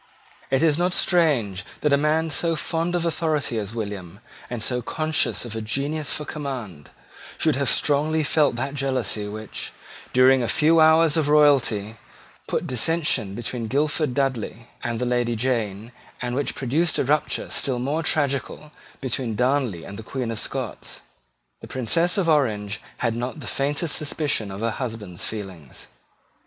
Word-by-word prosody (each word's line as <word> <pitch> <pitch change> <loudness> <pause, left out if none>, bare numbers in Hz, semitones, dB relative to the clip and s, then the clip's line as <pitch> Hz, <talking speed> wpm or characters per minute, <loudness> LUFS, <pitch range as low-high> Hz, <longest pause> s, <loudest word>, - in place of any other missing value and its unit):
It 135 +3 +2
is 155 -1 +3
not 180 +1 +1
strange 130 - +2 0.2
that 150 -2 +3
a - - +8
man 155 +2 +1
so 165 +4 +1
fond 165 +2 -1
of 170 -1 0
authority 155 -7 0
as 105 +2 -5
William, 100 -4 -5 0.3
and 120 -3 -3
so 125 +1 0
conscious 155 +1 0
of 115 -2 -5
a 110 - -3
genius 140 +7 -2
for 150 - -2
command, 125 - -6 0.5
should - - +2
have - - +1
strongly 155 +2 +2
felt 145 -2 +3
that 135 +4 -3
jealousy 130 -7 -1
which, 110 +1 -5 0.4
during 130 +1 +6
a 120 - 0
few 160 +6 +4
hours 160 0 +6
of 155 -2 +2
royalty, 130 -8 +4 0.5
put - - -1
dissension 130 - +1
between 120 0 -3
Guildford 145 +1 0
Dudley 120 -3 -2
and 120 -1 -2
the 125 - 0
Lady 120 -1 +1
Jane, 115 -3 -1 0.3
and 125 0 -3
which 145 +1 -1
produced 155 +6 0
a - - +2
rupture 150 +3 0
still 130 -3 0
more 140 +6 -1
tragical 150 -1 -1 0.3
between 125 -4 -2
Darnley 125 - +1
and 100 +2 -8
the 110 - -10
Queen 125 -4 -2
of 110 - -2
Scots. - - -3 0.6
The - - -10
Princess 165 - +1
of 190 -4 +1
Orange 110 -10 +1 0.2
had 115 -1 +1
not 125 +6 -4
the 140 - -8
faintest 145 +5 0
suspicion 145 -8 0
of 95 +2 -6
her 115 0 +1
husband's 110 -7 -5
feelings. 95 - -7
130 Hz, 160 wpm, -24 LUFS, 115-150 Hz, 0.6 s, a